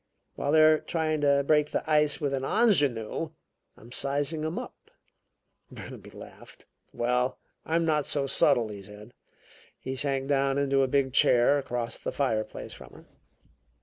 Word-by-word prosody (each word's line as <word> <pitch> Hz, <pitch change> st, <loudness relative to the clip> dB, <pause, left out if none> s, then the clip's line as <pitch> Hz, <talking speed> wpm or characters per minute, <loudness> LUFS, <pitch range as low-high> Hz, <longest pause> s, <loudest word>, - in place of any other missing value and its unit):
While 145 Hz, -, -2 dB
they 155 Hz, 0 st, +6 dB
are 155 Hz, 0 st, +5 dB
trying 155 Hz, -2 st, -2 dB
to 140 Hz, -1 st, +3 dB
break 150 Hz, 0 st, +3 dB
the -, -, -3 dB
ice 150 Hz, -1 st, +3 dB
with 145 Hz, -2 st, -2 dB
an 135 Hz, -1 st, -2 dB
ingenue, 145 Hz, -, +1 dB, 0.5 s
I'm 115 Hz, +2 st, -16 dB
sizing 145 Hz, +4 st, -1 dB
them 160 Hz, +2 st, -3 dB
up." -, -, -9 dB, 0.8 s
Burnaby -, -, -10 dB
laughed. -, -, -14 dB, 0.3 s
"Well, 125 Hz, +2 st, -1 dB, 0.3 s
I'm 165 Hz, +1 st, +1 dB
not 150 Hz, -3 st, +1 dB
subtle," 135 Hz, -5 st, +2 dB
he 100 Hz, -1 st, -8 dB
said. 105 Hz, +4 st, -13 dB, 0.7 s
He 130 Hz, -, -5 dB
sank 135 Hz, 0 st, -1 dB
down 140 Hz, -1 st, +1 dB
into 140 Hz, -1 st, +2 dB
a 135 Hz, -, +2 dB
big 130 Hz, -1 st, 0 dB
chair 125 Hz, +2 st, +4 dB
across 120 Hz, -3 st, -4 dB
the -, -, -4 dB
fireplace 115 Hz, -6 st, -3 dB
from -, -, -13 dB
her. -, -, -15 dB
140 Hz, 150 wpm, -27 LUFS, 125-150 Hz, 0.8 s, they